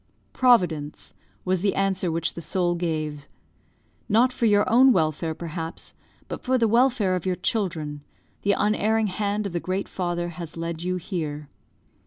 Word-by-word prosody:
"Providence," 175 Hz, -, +2 dB, 0.3 s
was 185 Hz, -1 st, +1 dB
the 200 Hz, 0 st, +1 dB
answer 190 Hz, -2 st, 0 dB
which 165 Hz, 0 st, 0 dB
the 170 Hz, -, -7 dB
soul 175 Hz, +1 st, 0 dB
gave. 155 Hz, -4 st, -3 dB, 0.8 s
"Not 240 Hz, +4 st, +4 dB
for 235 Hz, -, +1 dB
your 205 Hz, -1 st, +4 dB
own 260 Hz, +4 st, +6 dB
welfare, 160 Hz, -, 0 dB
perhaps, 165 Hz, 0 st, -6 dB, 0.3 s
but -, -, -6 dB
for 260 Hz, 0 st, +1 dB
the 230 Hz, -2 st, +3 dB
welfare 235 Hz, -4 st, +3 dB
of 180 Hz, +1 st, -3 dB
your 185 Hz, -, +1 dB
children, 170 Hz, -7 st, -2 dB, 0.4 s
the 200 Hz, -, +2 dB
unerring 215 Hz, +2 st, +1 dB
hand 205 Hz, +1 st, -1 dB
of 195 Hz, -, -4 dB
the 175 Hz, -, 0 dB
Great 185 Hz, +3 st, -2 dB
Father 175 Hz, -1 st, -2 dB
has 170 Hz, -1 st, -8 dB
led 165 Hz, 0 st, -4 dB
you 180 Hz, +1 st, -1 dB
here. 155 Hz, -5 st, -4 dB
180 Hz, 160 wpm, -25 LUFS, 165-210 Hz, 0.8 s, own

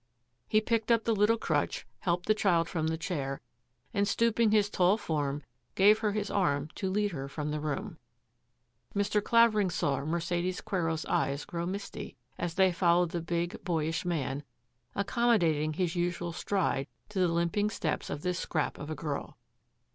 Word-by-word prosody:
He 215 Hz, -, +3 dB
picked 225 Hz, 0 st, 0 dB
up 230 Hz, -1 st, +4 dB
the 230 Hz, -, +1 dB
little 210 Hz, +3 st, +4 dB
crutch, 155 Hz, -9 st, -1 dB
helped 175 Hz, +3 st, 0 dB
the 215 Hz, -, +4 dB
child 175 Hz, -6 st, +2 dB
from 160 Hz, -3 st, -1 dB
the 160 Hz, 0 st, -1 dB
chair, 140 Hz, -5 st, -3 dB, 0.5 s
and, 200 Hz, 0 st, +2 dB
stooping 230 Hz, 0 st, +3 dB
his 210 Hz, -1 st, +4 dB
tall 190 Hz, 0 st, +3 dB
form, 145 Hz, -6 st, -2 dB, 0.3 s
gave 210 Hz, +3 st, +6 dB
her 215 Hz, -2 st, +1 dB
his 210 Hz, -1 st, -2 dB
arm 145 Hz, -6 st, +1 dB
to 190 Hz, -, -2 dB
lead 205 Hz, +1 st, +1 dB
her 135 Hz, -5 st, -5 dB
from 150 Hz, +1 st, -4 dB
the 150 Hz, -, -2 dB
room. 160 Hz, +4 st, -4 dB, 1.0 s
Mr. 205 Hz, +1 st, +1 dB
Clavering 220 Hz, -4 st, +4 dB
saw 140 Hz, -5 st, 0 dB
Mercedes 170 Hz, +3 st, -1 dB
Quero's 165 Hz, -6 st, -1 dB
eyes 140 Hz, +1 st, 0 dB
grow 170 Hz, -3 st, -3 dB
misty 195 Hz, -7 st, -6 dB, 0.2 s
as 170 Hz, -1 st, -2 dB
they 190 Hz, -1 st, +5 dB
followed 175 Hz, -1 st, +3 dB
the 170 Hz, -, -2 dB
big, 170 Hz, +4 st, -2 dB
boyish 165 Hz, -3 st, -1 dB
man, 145 Hz, -6 st, -1 dB, 0.5 s
ac 200 Hz, -, +1 dB
commodating 170 Hz, -, +2 dB
his 180 Hz, -1 st, 0 dB
usual 175 Hz, -1 st, -1 dB
stride 175 Hz, -7 st, 0 dB, 0.2 s
to 205 Hz, -2 st, -3 dB
the 180 Hz, -, +4 dB
limping 170 Hz, +5 st, +1 dB
steps 160 Hz, -7 st, -2 dB
of 145 Hz, -, -4 dB
this 180 Hz, 0 st, -1 dB
scrap 155 Hz, -3 st, -2 dB
of 145 Hz, -, -6 dB
a 155 Hz, -, -3 dB
girl. 150 Hz, -3 st, -4 dB
175 Hz, 170 wpm, -30 LUFS, 160-205 Hz, 1.0 s, gave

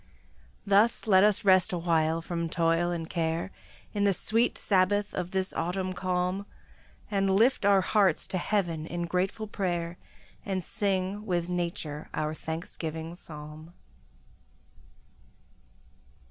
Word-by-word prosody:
Thus 205 Hz, +3 st, +3 dB
let 190 Hz, -3 st, +6 dB
us 210 Hz, 0 st, +3 dB
rest 185 Hz, -2 st, +5 dB
awhile 165 Hz, -2 st, +1 dB
from 170 Hz, -1 st, -3 dB
toil 165 Hz, +1 st, +1 dB
and 170 Hz, -2 st, -3 dB
care, 165 Hz, +2 st, -2 dB, 0.4 s
In 205 Hz, -1 st, 0 dB
the 200 Hz, -2 st, +3 dB
sweet 225 Hz, +6 st, +1 dB
sabbath 205 Hz, +1 st, +2 dB
of 180 Hz, -, -3 dB
this 190 Hz, 0 st, -1 dB
autumn 185 Hz, +3 st, -2 dB
calm, 185 Hz, +2 st, -1 dB, 0.6 s
And 195 Hz, -1 st, +1 dB
lift 230 Hz, +1 st, +3 dB
our 200 Hz, -1 st, +5 dB
hearts 190 Hz, -3 st, +2 dB
to 185 Hz, -, -1 dB
heaven 170 Hz, -5 st, -1 dB
in 175 Hz, 0 st, -3 dB
grateful 185 Hz, +5 st, -1 dB
prayer, 175 Hz, -4 st, -3 dB, 0.4 s
And 190 Hz, -2 st, -2 dB
sing 200 Hz, 0 st, -1 dB
with 175 Hz, -2 st, 0 dB
nature 170 Hz, -4 st, -3 dB
our 155 Hz, 0 st, -1 dB
thanksgiving 160 Hz, 0 st, -5 dB
psalm. 155 Hz, -1 st, -10 dB
180 Hz, 120 wpm, -28 LUFS, 165-195 Hz, 0.6 s, let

